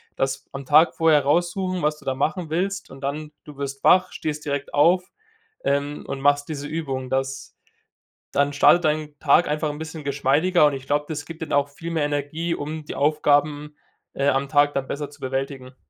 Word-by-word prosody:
Das 135 0 -2
am 135 0 -7
Tag 155 +4 +5
vorher 155 -3 +4
raussuchen, 175 +4 0
was 150 0 0
du - - -18
da 135 - 0
machen 155 +4 -2
willst, 195 0 -2
und 135 - -12
dann, 150 +2 -4
du 150 -2 -12
wirst 140 -1 -5
wach, 185 0 +5
stehst 150 -1 -4
direkt 140 -1 -3
auf, 175 +5 +4 0.6
ähm, 140 +1 -1
und 135 - -4
machst 145 0 +3
diese 145 -1 -4
Übung. 135 -5 -4
Das 135 0 -3 0.8
dann 140 0 +2
startet 160 +4 +5
dein 150 -1 -1
Tag 155 +4 +4
einfach 150 +1 -1
'n 145 - -5
bisschen 160 -1 -7
geschmeidiger 145 +5 +2
und 145 - +3
ich 135 0 -7
glaube, 145 +1 +1
das 150 -2 -5
gibt 165 +1 -7
dann - - -5
auch 145 0 +2
viel 165 +4 -7
mehr 160 -3 0
Energie, 145 +4 -2
um 155 +2 -5
die - - -7
Aufgaben, 150 0 +1 0.4
äh, 140 - 0
am 135 0 +1
Tag 145 -1 +3
da 135 - 0
besser 145 +2 -5
zu 145 - -17
bewältigen. 135 -1 -4
145 Hz, 195 wpm, -23 LUFS, 140-155 Hz, 0.8 s, Tag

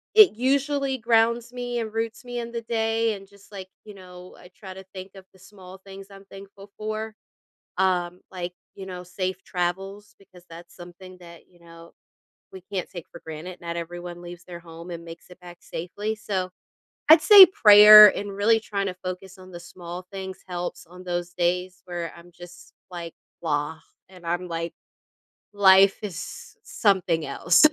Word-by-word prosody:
it 430 -3 +8
usually 275 +2 0
grounds 230 0 +1
me 245 -1 -4
and 220 -2 -5
roots 225 +1 -4
me 245 -1 -6
in 235 0 -6
the 235 - -4
day 225 -1 -1
and 195 -1 -13
just 200 +1 -21
like, 190 -2 -9 0.2
you 210 - -12
know, 180 -1 -13
I 180 - -16
try 190 -3 -10
to 190 +1 -12
think 190 0 -9
of 190 -1 -13
the 190 - -22
small 190 -1 -14
things 195 0 -11
I'm 195 0 -14
thankful 195 +1 -13
for. 215 +1 -5 0.7
Um, 180 -1 0
like, 180 -1 -6 0.2
you 195 - -9
know, 180 -1 -8
safe 185 +1 -5
travels, 195 +3 -4
because 185 -3 -20
that's 170 +1 -13
something 180 +1 -13
that, 170 -2 -14
you 175 - -25
know, 165 0 -16 0.6
we 190 - -11
can't 185 -3 -4
take 175 -3 -9
for - - -13
granted, 160 +3 -8
not 170 0 -5
everyone 175 +1 -8
leaves 175 0 -11
their 175 -1 -10
home 170 +1 -12
and 170 -1 -7
makes 165 +1 -13
it 180 - -16
back 175 -1 -13
safely, 205 +6 -5
so, 195 -4 -4 0.6
I'd 315 0 +9
say 405 0 +10
prayer 210 - +9
and 200 -1 -6
really 225 +3 +3
trying 200 -2 -3
to 185 - -5
focus 185 +1 -7
on 185 0 -14
the 175 - -9
small 175 +1 -10
things 190 -1 -7
helps 175 -1 -6
on 180 +2 -14
those 175 -1 -3
days 180 +1 -2
where 175 -2 -5
I'm 170 +1 -16
just 175 +1 -14 0.2
like, 170 -2 -7 0.3
"Blah." 150 0 -2 0.3
And 180 -2 -16
I'm 175 +2 -3
like, 165 0 -4 0.8
"Life 195 -1 +5
is 180 -5 -8
something 185 -6 0
else." 165 - +3
185 Hz, 175 wpm, -24 LUFS, 175-210 Hz, 0.8 s, say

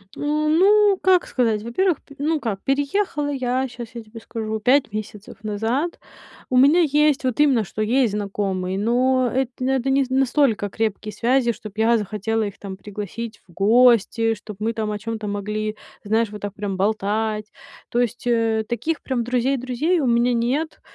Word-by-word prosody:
А, - - -11
ну 345 +8 +3
как 370 -1 +4
сказать? 225 -4 0
Во-первых, 315 - 0
п 280 - -16
ну 305 +2 0
как 205 -6 -3
переехала 290 +2 0
я, 260 0 -1
щас 240 -2 -8
я 235 - -5
тебе 220 +1 -11
скажу, 220 -1 -4
5 265 +3 +3
месяцев 215 0 -7
назад. 225 +10 -2 0.5
У 255 - +2
меня 290 +7 +6
есть 300 -2 +2
вот 255 0 -1
именно, 270 -7 +4
что 210 +3 -6
есть 235 0 +2
знакомые, 195 -2 -2
но 250 +4 +2
это 260 -1 0
н 260 - +1
это 265 0 0
не 270 0 +3
настолько 260 -5 +2
крепкие 215 0 -2
связи, 240 +2 +2
чтоб 215 -2 -10
я 225 +1 +4
захотела 215 +2 -2
их 200 -2 -5
там 195 -2 -7
пригласить 210 +3 -7
в - - -19
гости, 225 +2 +4
чтоб 210 -1 -11
мы 225 +2 -1
там 215 -1 -2
о 210 - -4
чём-то 220 0 -5
могли, 210 +1 -3 0.3
знаешь, 220 +1 +1
вот 210 0 -9
так 205 -1 -4
прямо 200 -2 -4
болтать. 215 +2 -1 0.4
То 240 - 0
есть, 245 0 -1
э, 225 -2 +2
таких 280 +7 -2
прям 250 -3 -2
друзей-друзей 255 +6 0
у 270 - 0
меня 235 +1 +3
нет. 260 +7 -1
235 Hz, 175 wpm, -22 LUFS, 215-270 Hz, 0.5 s, меня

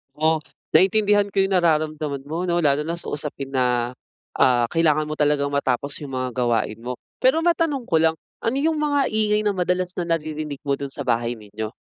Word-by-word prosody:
O, 160 +1 +2 0.4
naintindihan 205 +1 +3
ko 195 - +3
'yong 190 -1 +2
nararamdaman 155 -4 0
mo 170 +4 -2
'no 175 -1 +1
lalo 150 -1 +2
na 165 - -2
sa 170 - -3
usapin 140 -2 -4
na, 125 -2 0 0.4
ah, 120 -2 +3
kailangan 155 -2 +2
mo 155 - -4
talagang 145 -1 +2
matapos 140 0 0
'yong 140 -3 -8
mga 130 0 -1
gawain 120 -3 0
mo. 125 - -2 0.2
Pero, 265 +6 +3
matanong 330 -5 +1
ko 165 - +4
lang, 160 0 +3 0.2
ano 225 +3 -1
'yong 315 +2 +1
mga 295 -1 +1
ingay 215 -1 +1
na 205 -1 +1
madalas 180 0 -1
na 175 - -1
naririnig 155 -3 -3
mo 140 -1 -1
do'n 140 -1 -6
sa - - -5
bahay 120 -2 0
ninyo? 110 -1 -7
155 Hz, 190 wpm, -23 LUFS, 135-185 Hz, 0.4 s, ko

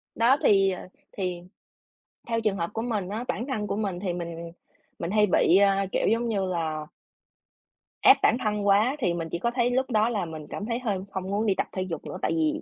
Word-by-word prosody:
Đó 240 +4 +4
thì, 195 -1 +5
ờ, 185 - -6 0.2
thì 180 -3 -3 0.9
theo 230 -1 0
trường 210 -3 0
hợp 170 0 -2
của 225 - -2
mình, 215 -6 -2
á, 220 +4 -3
bản 235 - -2
thân 220 -7 -2
của - - -2
mình 200 -4 -2
thì 185 -2 -2
mình 170 -1 -6 0.5
mình 170 - -3
hay 210 0 +4
bị, 180 -1 +4
a, 195 0 +3
kiểu, - - +1
giống 230 +1 +1
như 200 -4 0
là 160 -4 -2 1.1
ép - - +8
bản - - +4
thân 210 -3 -1
quá 210 +7 +4
thì 180 -10 +1
mình 165 -1 -4
chỉ 170 - -3
có 235 +6 0
thấy 245 0 +1
lúc 260 +2 0
đó 220 -1 +2
là 210 -6 -1
mình 155 -2 -8
cảm 205 - -5
thấy 230 +1 -2
hơi 210 -7 -1
không 190 -2 -3
muốn 210 +2 0
đi 200 -3 +2
tập - - -1
thể 185 - -3
dục 175 -4 -5
nữa - - -6
tại - - 0
vì 315 -1 0
200 Hz, 235 wpm, -26 LUFS, 180-230 Hz, 1.1 s, ép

